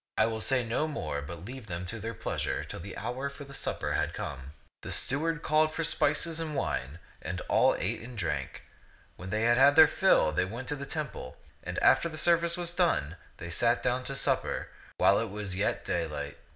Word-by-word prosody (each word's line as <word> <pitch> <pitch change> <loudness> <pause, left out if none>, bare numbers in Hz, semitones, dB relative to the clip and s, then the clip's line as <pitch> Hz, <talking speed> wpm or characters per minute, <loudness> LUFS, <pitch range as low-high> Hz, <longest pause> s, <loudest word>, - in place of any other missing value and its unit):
I 110 - +5
will 110 -1 -2
say 130 -1 +2
no 120 +7 0
more, 75 - -3
but 85 +4 -8
leave 125 0 -8
them 85 -1 -4
to 110 +5 -4
their 115 +2 -5
pleasure - - -2
till - - -8
the 95 +3 -8
hour 125 +5 -3
for 140 +1 -10
the 140 0 -12
supper - - -2
had - - -1
come. 70 0 -6 0.3
The - - -7
steward 155 +4 +1
called 155 0 +3
for 165 - -1
spices 160 +1 +2
and 155 -2 -3
wine, 70 - -2 0.2
and - - -4
all - - +3
ate - - -2
and 120 +1 -10
drank. 75 -7 -3 0.5
When 90 - -9
they 105 +3 0
had 120 +1 +4
had 140 +2 +6
their 160 -1 +9
fill, 190 - +3
they 80 +4 +1
went 115 +7 -7
to 150 - -1
the 140 -1 -7
temple; 145 - -5 0.3
and - - -5
after 170 - +5
the 155 - -6
service 170 +2 +3
was 175 -1 -3
done, 165 - +1 0.2
they 85 0 -7
sat 120 +7 +2
down 125 0 0
to 135 - -2
supper, - - -1 0.3
while 100 - +5
it 115 - -2
was 100 -2 -4
yet 100 +3 -1
daylight. 85 -4 -3
120 Hz, 210 wpm, -29 LUFS, 90-150 Hz, 0.5 s, their